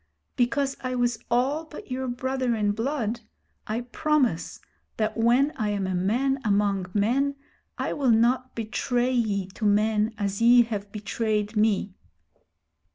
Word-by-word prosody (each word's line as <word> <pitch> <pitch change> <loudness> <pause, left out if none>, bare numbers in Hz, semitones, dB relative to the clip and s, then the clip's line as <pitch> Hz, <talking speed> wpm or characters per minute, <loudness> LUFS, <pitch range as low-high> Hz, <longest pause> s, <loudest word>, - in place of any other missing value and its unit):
Because 270 +3 +1
I 255 0 -3
was 240 -2 0
all 260 +6 +1
but 300 -4 -11
your 260 +1 -2
brother 255 0 -1
in 210 -2 +1
blood, 235 0 -2 0.5
I 220 +3 -2
promise 250 - 0 0.4
that 215 -1 0
when 245 +6 +3
I 215 -1 -1
am 200 -2 -1
a 185 - -2
man 245 +10 +1
among 200 -3 +1
men 265 +7 +1 0.4
I - - -2
will 275 -3 0
not 240 +3 +2
betray 245 +2 -1
ye 215 -6 0
to 190 - -10
men 215 +1 +2
as 200 0 -2
ye 240 +1 +7
have 205 -3 -5
betrayed 215 0 -2
me.' 210 -2 +1
230 Hz, 145 wpm, -26 LUFS, 210-255 Hz, 0.5 s, ye